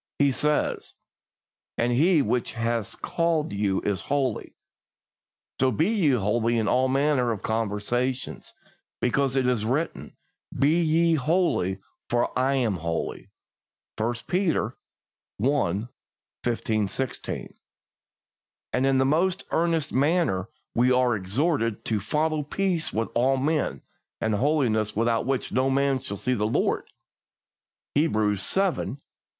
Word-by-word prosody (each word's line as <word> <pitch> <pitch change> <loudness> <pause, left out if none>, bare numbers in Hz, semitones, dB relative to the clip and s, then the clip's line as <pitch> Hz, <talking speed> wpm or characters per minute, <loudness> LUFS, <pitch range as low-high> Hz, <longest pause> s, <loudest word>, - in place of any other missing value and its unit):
He 140 -1 +4
says: 150 +3 -1 0.8
"As 120 +1 +1
He 155 +5 +4
which 120 +3 -1
hath 115 -2 -2
called 165 -7 0
you 100 -1 0
is 100 -4 -1
holy, 135 -6 -2 1.0
so 130 - +4
be 155 - +1
ye 200 -9 +2
holy 115 +1 +1
in 110 -2 0
all 130 +4 +3
manner 135 -2 +2
of 110 - -4
conversation; 115 +4 -1 0.6
because 135 +2 +1
it 130 -1 +2
is 125 -4 +1
written, 135 +9 -2 0.4
Be 150 +6 +3
ye 165 +1 +3
holy, 155 - +1 0.3
for 120 0 +1
I 135 +2 +2
am 115 -8 +1
holy" 85 0 -4 0.7
(1 110 +2 0
Peter 180 -2 0 0.6
i. 115 -5 +1 0.6
15, 110 -3 0
16). 130 +6 -4 1.2
And 130 - +2
in 135 -1 +3
the 130 - +3
most 170 +6 +1
earnest 165 -2 0
manner 140 - +1 0.2
we 125 +2 +3
are 125 -2 +3
exhorted 115 - -1
to 110 -2 0
"follow 150 +9 0
peace 175 +2 -1
with 115 +1 -1
all 130 +3 +2
men, 150 +2 -1 0.4
and 110 - 0
holiness, 115 -4 +1
without 115 +2 +1
which 135 -2 -1
no 130 +1 +2
man 135 0 +2
shall 110 -6 -5
see 130 +6 -1
the 105 -3 0
Lord" 110 - 0 1.1
(Hebrews 110 -9 +1
xii. 195 - +3
14). 185 -7 -1
130 Hz, 130 wpm, -26 LUFS, 110-150 Hz, 1.2 s, He